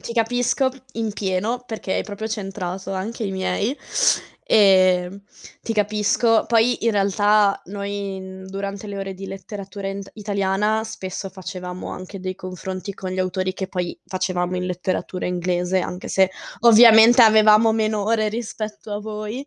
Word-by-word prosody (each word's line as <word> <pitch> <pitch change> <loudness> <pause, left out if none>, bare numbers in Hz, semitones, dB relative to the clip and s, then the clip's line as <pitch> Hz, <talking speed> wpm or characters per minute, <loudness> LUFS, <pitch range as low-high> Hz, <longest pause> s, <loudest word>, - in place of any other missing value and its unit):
ti - - -6
capisco 245 +3 +1 0.2
in 225 -2 -3
pieno, 205 +5 -2
perché 220 -4 -4
hai - - 0
proprio 210 +1 -6
centrato 195 -3 -4
anche 215 +5 -4
i 200 - -2
miei. 190 +7 -1 0.7
Ehm, 185 -2 +4 0.4
ti 225 - -3
capisco, 210 +2 +2
poi, 235 0 +2
in - - +5
realtà, 205 0 +3
noi 200 0 -4
in 190 0 -9
durante 195 +2 -5
le 200 -1 -6
ore 195 0 -4
di 195 +1 -8
letteratura 195 +1 -7
int 195 0 -6
italiana, 205 +1 0
spesso 190 -2 -6
facevamo 185 -1 -7
anche 185 +2 -8
dei 185 0 -4
confronti 185 +1 -6
con 185 -1 -6
gli 185 - -4
autori 185 0 -1
che 190 0 -5
poi 180 -2 -4
facevamo 185 -1 -2
in 180 - -2
letteratura 180 +1 -3
inglese, 180 +1 0
anche 180 0 -5
se, 190 -1 +3 0.3
ovviamente, 230 +1 +8
avevamo 220 0 +6
meno 215 -2 0
ore 215 0 +1
rispetto 215 -1 -6
a 205 0 -3
voi. 215 +5 -6
200 Hz, 150 wpm, -22 LUFS, 185-215 Hz, 0.7 s, ovviamente